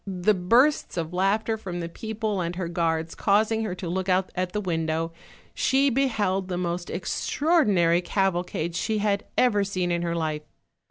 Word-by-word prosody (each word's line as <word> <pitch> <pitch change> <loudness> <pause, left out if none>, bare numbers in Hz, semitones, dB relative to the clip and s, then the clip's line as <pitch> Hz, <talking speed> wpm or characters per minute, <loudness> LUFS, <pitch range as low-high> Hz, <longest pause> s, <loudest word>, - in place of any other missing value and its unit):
The 190 +2 +2
bursts 235 +9 +2
of 165 0 -3
laughter 210 +4 +1
from 185 -5 -6
the 170 - -3
people 215 +2 -3
and 170 0 -3
her 180 -1 -3
guards 165 -1 -1
causing 220 +2 +2
her 195 -5 -3
to 185 -1 -6
look 185 +2 -2
out 185 0 +2
at 185 -1 -2
the 210 - -2
window, 165 -3 -1 0.4
she 275 +1 +2
beheld 210 -8 0
the 180 -1 -3
most 175 0 -3
extraordinary 190 - +2
caval 185 -1 0
cade 170 -1 -4
she 220 +4 0
had 205 -1 0
ever 210 -5 +3
seen 185 -3 -1
in 170 0 0
her 170 -1 -1
life. 155 -2 -2
185 Hz, 175 wpm, -25 LUFS, 175-215 Hz, 0.4 s, ever